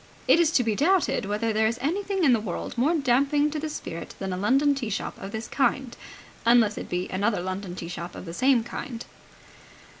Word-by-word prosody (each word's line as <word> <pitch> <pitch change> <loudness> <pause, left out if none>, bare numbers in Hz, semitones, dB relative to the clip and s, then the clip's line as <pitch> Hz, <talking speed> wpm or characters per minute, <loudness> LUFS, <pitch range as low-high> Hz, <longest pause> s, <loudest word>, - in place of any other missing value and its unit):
It - - +6
is 335 -3 +4
to 250 - +4
be 225 -2 +1
doubted 335 - +2
whether 210 +3 -1
there 220 +1 +3
is 230 +2 -1
anything 385 +7 -1
in 270 -5 +6
the 230 - +3
world 205 -5 -5
more 280 +8 +2
damping 285 +1 +2
to 305 - -3
the 310 +1 -3
spirit 170 - -7
than 190 -1 -4
a - - -1
London 270 +9 +3
tea 260 -5 -3
shop 200 - -3
of 195 - -6
this 220 +2 -5
kind, 265 -2 0 0.5
unless 230 -3 +4
it - - -7
be 180 +1 -2
another 205 +3 0
London 185 0 -4
tea 170 - -6
shop 175 0 -6
of - - -8
the 165 - -7
same 255 +3 +3
kind. 240 0 -6
235 Hz, 215 wpm, -26 LUFS, 200-285 Hz, 0.5 s, It